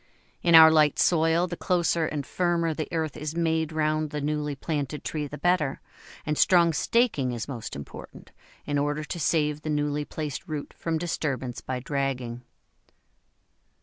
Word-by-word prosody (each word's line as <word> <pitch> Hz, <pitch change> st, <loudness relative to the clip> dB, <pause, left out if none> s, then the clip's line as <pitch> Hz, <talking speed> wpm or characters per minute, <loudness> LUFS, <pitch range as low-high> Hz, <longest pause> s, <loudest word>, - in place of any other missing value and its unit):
In 170 Hz, -1 st, +5 dB
our 160 Hz, 0 st, +10 dB
light 150 Hz, -2 st, +4 dB
soil, 165 Hz, 0 st, +3 dB
the 175 Hz, -1 st, -5 dB
closer 170 Hz, -2 st, +1 dB
and 145 Hz, -2 st, -4 dB
firmer 170 Hz, +1 st, 0 dB
the 155 Hz, 0 st, -4 dB
earth 160 Hz, -3 st, -2 dB
is 150 Hz, +1 st, -5 dB
made 160 Hz, -1 st, 0 dB
round 155 Hz, 0 st, 0 dB
the 150 Hz, 0 st, -4 dB
newly 150 Hz, 0 st, -2 dB
planted 145 Hz, 0 st, -3 dB
tree 150 Hz, -2 st, -3 dB
the 150 Hz, -, -8 dB
better, 170 Hz, -6 st, +1 dB, 0.5 s
and 150 Hz, -1 st, -1 dB
strong 170 Hz, -3 st, +5 dB
staking 155 Hz, -, +1 dB
is 115 Hz, -2 st, -4 dB
most 120 Hz, -6 st, -6 dB
important, 70 Hz, -, -10 dB, 0.3 s
in 145 Hz, -1 st, 0 dB
order 145 Hz, +1 st, -1 dB
to 170 Hz, -, -5 dB
save 150 Hz, -1 st, +1 dB
the 155 Hz, -, -5 dB
newly 150 Hz, 0 st, 0 dB
placed 150 Hz, +3 st, -5 dB
root 150 Hz, -3 st, -5 dB
from 165 Hz, -1 st, -2 dB
disturbance 135 Hz, -7 st, -3 dB
by 130 Hz, -1 st, -4 dB
dragging. 130 Hz, -3 st, -3 dB
150 Hz, 160 wpm, -26 LUFS, 145-165 Hz, 0.5 s, our